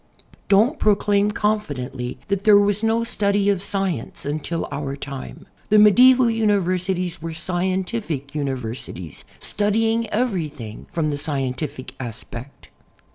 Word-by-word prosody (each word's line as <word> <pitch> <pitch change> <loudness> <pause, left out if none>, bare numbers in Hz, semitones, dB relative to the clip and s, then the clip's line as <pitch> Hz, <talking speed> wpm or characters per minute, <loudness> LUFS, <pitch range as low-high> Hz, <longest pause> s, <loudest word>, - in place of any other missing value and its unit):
Don't 225 +10 +4
proclaim 205 -1 +3
confidently 145 -13 -2
that 200 -1 -1
there 210 -1 +7
was 205 0 +2
no 225 +1 +2
study 200 -3 +1
of 195 -3 -1
science 195 - -3
until 155 +3 -3
our 140 -1 -3
time. 140 -1 -8 0.2
The 215 - +5
medieval 250 +4 +7
universities 185 -5 0
were 165 0 -5
.scientific 180 - -2
universities, 125 - -5
studying 225 +2 +1
everything 160 - -3
from 155 -3 0
the 145 - -2
scien 140 -4 -2
tific 130 -2 -6
aspect. 120 +2 -8
185 Hz, 120 wpm, -22 LUFS, 140-210 Hz, 0.2 s, there